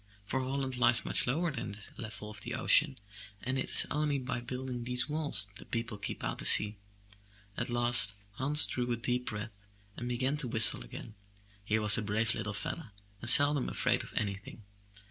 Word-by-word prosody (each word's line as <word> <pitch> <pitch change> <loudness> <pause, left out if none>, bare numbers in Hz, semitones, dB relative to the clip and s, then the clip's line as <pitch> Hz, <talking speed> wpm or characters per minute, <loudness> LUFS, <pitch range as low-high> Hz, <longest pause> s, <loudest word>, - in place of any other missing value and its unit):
For 130 - -4
Holland 130 0 -5
lies 120 -1 +3
much - - -2
lower 165 +7 -2
than 110 -7 -8
the 105 0 -8
level 105 -2 -9
of 105 -1 -7
the 120 +3 -7
ocean 135 +1 +2 0.5
and 130 +1 -4
it - - -6
is - - 0
only 150 -1 -2
by 130 -2 -6
building 125 0 -7
these 125 +2 -2
walls, 145 -10 -2
that 100 0 -20
the - - -15
people 115 -2 -6
keep - - -7
out - - -5
the - - -3
sea. 105 0 +6 0.8
At - - -6
last 120 -4 +3 0.2
Hans 135 +8 +5
drew 125 -1 -5
a - - -2
deep 125 +1 -5
breath 105 -1 -9 0.3
and 120 0 -8
began 130 +4 -3
to 145 -4 -5
whistle 110 - +5
again; 85 - -12 0.5
he 105 +2 -2
was 105 -2 +9
a - - -4
brave 110 +2 -2
little 105 0 -6
fellow 145 +5 -7 0.3
and 120 - +2
seldom 145 +1 +7
afraid 125 -1 -2
of - - -13
anything. 100 -1 -7
120 Hz, 195 wpm, -29 LUFS, 105-130 Hz, 0.8 s, was